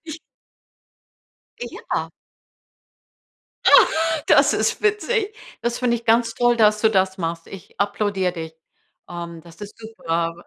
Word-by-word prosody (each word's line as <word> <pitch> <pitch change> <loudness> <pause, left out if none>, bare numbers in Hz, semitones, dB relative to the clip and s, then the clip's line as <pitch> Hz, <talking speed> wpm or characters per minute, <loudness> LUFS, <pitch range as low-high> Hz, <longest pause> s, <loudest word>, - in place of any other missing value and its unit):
Ich 320 0 -8 1.4
Ja. - - -5 1.5
Ah, - - +8 0.4
das - - +5
ist - - -1
witzig. 425 0 0 0.3
Das 235 0 -2
finde 240 -1 +1
ich 235 - -11
ganz 230 0 +2
toll, 240 0 +2
dass 215 -2 +3
du 220 - +3
das 190 -2 0
machst. 165 -1 -4
Ich 195 -4 -13
applaudiere 200 -2 -1
dich. 160 -2 -7 0.6
Ähm, 170 -1 -7
das 165 0 -17
ist 205 0 -10
super, 170 -7 -3
205 Hz, 125 wpm, -21 LUFS, 170-235 Hz, 1.5 s, Ah